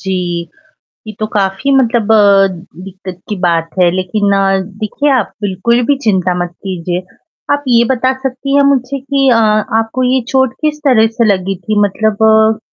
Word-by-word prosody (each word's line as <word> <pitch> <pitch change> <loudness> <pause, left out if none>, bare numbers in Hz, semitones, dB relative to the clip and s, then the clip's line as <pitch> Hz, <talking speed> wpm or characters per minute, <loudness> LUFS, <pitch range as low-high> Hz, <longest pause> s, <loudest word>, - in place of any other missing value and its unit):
जी, 190 -1 -2 0.9
ये 215 - -7
तो 215 - 0
काफ़ी 195 +6 0
मतलब 230 -4 +1
अ, 200 -2 +5 0.4
दिक्कत 185 -1 -10
की 210 - -3
बात 165 -1 0
है। 175 -1 +4
लेकिन 200 +2 -1
अ, 195 0 +2 0.2
देखिए 285 +7 -1
आप 215 - -3
बिल्कुल 205 +5 0
भी 285 - +2
चिंता 185 -4 +1
मत 175 0 -10
कीजिए, 180 -1 -4 0.5
आप 285 0 0
ये 235 -1 +4
बता 255 +1 0
सकती 270 +1 -2
हैं 285 - +5
मुझे 270 +1 -2
कि 275 0 0
अ, 235 - +4 0.4
आपको 225 +3 -2
ये 260 - +2
चोट 265 -2 +1
किस 305 -1 -1
तरह 225 -4 +4
से 235 - +3
लगी 190 +1 -4
थी 205 +4 -2
मतलब 210 +1 0
अ 220 0 +3
215 Hz, 175 wpm, -13 LUFS, 190-255 Hz, 0.9 s, अ